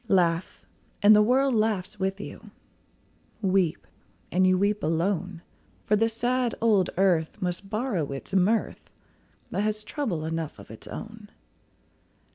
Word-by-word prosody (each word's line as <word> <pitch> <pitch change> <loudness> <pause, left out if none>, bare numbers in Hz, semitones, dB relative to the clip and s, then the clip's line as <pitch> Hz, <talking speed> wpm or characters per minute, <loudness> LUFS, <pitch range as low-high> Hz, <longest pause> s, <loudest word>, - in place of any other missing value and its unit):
Laugh, 175 -3 +1 0.4
and 210 +1 +8
the 210 - +6
world 260 +4 +3
laughs 210 -3 0
with 195 +1 -1
you; - - -9 0.9
Weep, 190 -5 +1 0.5
and 185 +1 +3
you 185 0 +4
weep 205 +2 +1
alone; 170 +2 -1 0.4
For 210 - +3
the 225 +2 +2
sad 240 +1 0
old 210 -5 +3
earth 175 -5 +2
must 180 +2 -3
borrow 210 - -1
its 135 +6 -7
mirth, 195 +4 +1 0.6
But - - -1
has 215 0 -1
trouble 215 - -3
enough 160 -1 -4
of 100 +1 -13
its 110 - -11
own. 220 -1 -9
195 Hz, 135 wpm, -26 LUFS, 175-215 Hz, 0.9 s, and